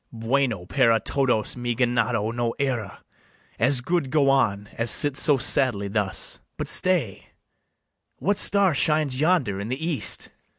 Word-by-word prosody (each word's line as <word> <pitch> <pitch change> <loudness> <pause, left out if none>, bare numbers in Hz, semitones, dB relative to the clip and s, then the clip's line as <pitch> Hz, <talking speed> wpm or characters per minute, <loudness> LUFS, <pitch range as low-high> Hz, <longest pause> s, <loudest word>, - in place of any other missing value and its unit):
BARABAS. 115 -1 -10
Bueno 125 -8 0
para 115 +1 +2
todos 125 -6 -1
mi 120 -1 -3
ganado 120 -2 -1
no 120 -1 -3
era: 125 -8 -4 0.6
As 135 -2 +1
good 165 0 -2
go 140 -1 +2
on, 105 -7 0
as 115 +1 -2
sit 130 +7 +4
so 145 0 +2
sadly 125 -5 +1
thus. 100 -2 0 0.2
But - - -5
stay: 170 - 0 0.9
what 205 +1 -1
star 200 -4 +3
shines 150 -2 +1
yonder 150 - 0
in 100 +2 -6
the 130 - -3
east? 160 -6 +1
125 Hz, 145 wpm, -23 LUFS, 115-140 Hz, 0.9 s, sit